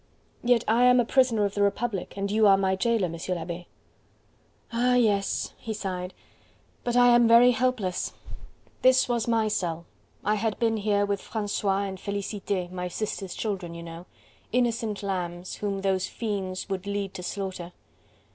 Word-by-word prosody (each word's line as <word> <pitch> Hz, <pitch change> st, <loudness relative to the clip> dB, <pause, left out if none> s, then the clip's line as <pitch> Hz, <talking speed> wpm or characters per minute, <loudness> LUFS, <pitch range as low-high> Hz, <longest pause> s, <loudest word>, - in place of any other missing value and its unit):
"Yet 240 Hz, -1 st, +3 dB
I 235 Hz, +3 st, +4 dB
am 250 Hz, 0 st, +6 dB
a 240 Hz, -, +3 dB
prisoner 235 Hz, -4 st, +3 dB
of 200 Hz, -, -2 dB
the 205 Hz, -, -1 dB
Republic 200 Hz, -1 st, -1 dB
and 200 Hz, 0 st, -2 dB
you 215 Hz, 0 st, +4 dB
are 195 Hz, -1 st, +7 dB
my 190 Hz, -1 st, +1 dB
jailer, 225 Hz, +1 st, +1 dB
M. 170 Hz, -, -4 dB
l'Abbe." 175 Hz, -1 st, -4 dB, 1.1 s
"Ah, 250 Hz, +2 st, +3 dB
yes!" 205 Hz, -5 st, +1 dB
he 220 Hz, -1 st, -5 dB
sighed. 185 Hz, -3 st, -4 dB, 0.7 s
"But 240 Hz, -1 st, -1 dB
I 245 Hz, 0 st, +6 dB
am 240 Hz, -1 st, +6 dB
very 235 Hz, +2 st, +7 dB
helpless. 245 Hz, -7 st, -1 dB, 0.7 s
This 255 Hz, 0 st, +5 dB
was 240 Hz, -2 st, 0 dB
my 225 Hz, -2 st, +2 dB
cell. 170 Hz, -6 st, -2 dB, 0.4 s
I 210 Hz, -, +3 dB
had 220 Hz, 0 st, -1 dB
been 225 Hz, -1 st, +1 dB
here 205 Hz, -1 st, +1 dB
with 200 Hz, -1 st, -2 dB
Francois 205 Hz, -2 st, -1 dB
and 190 Hz, -1 st, -5 dB
Felicite, 200 Hz, -2 st, -3 dB
my 180 Hz, -1 st, -4 dB
sister's 195 Hz, 0 st, -4 dB
children, 190 Hz, -6 st, -3 dB
you 170 Hz, -, -7 dB
know. 170 Hz, +1 st, -9 dB, 0.4 s
Innocent 230 Hz, -4 st, 0 dB
lambs, 180 Hz, -2 st, -4 dB
whom 200 Hz, -2 st, -2 dB
those 190 Hz, -1 st, 0 dB
fiends 195 Hz, -5 st, -4 dB
would 195 Hz, 0 st, -4 dB
lead 200 Hz, -1 st, -2 dB
to -, -, -6 dB
slaughter. 185 Hz, -2 st, -5 dB
200 Hz, 165 wpm, -27 LUFS, 185-230 Hz, 1.1 s, are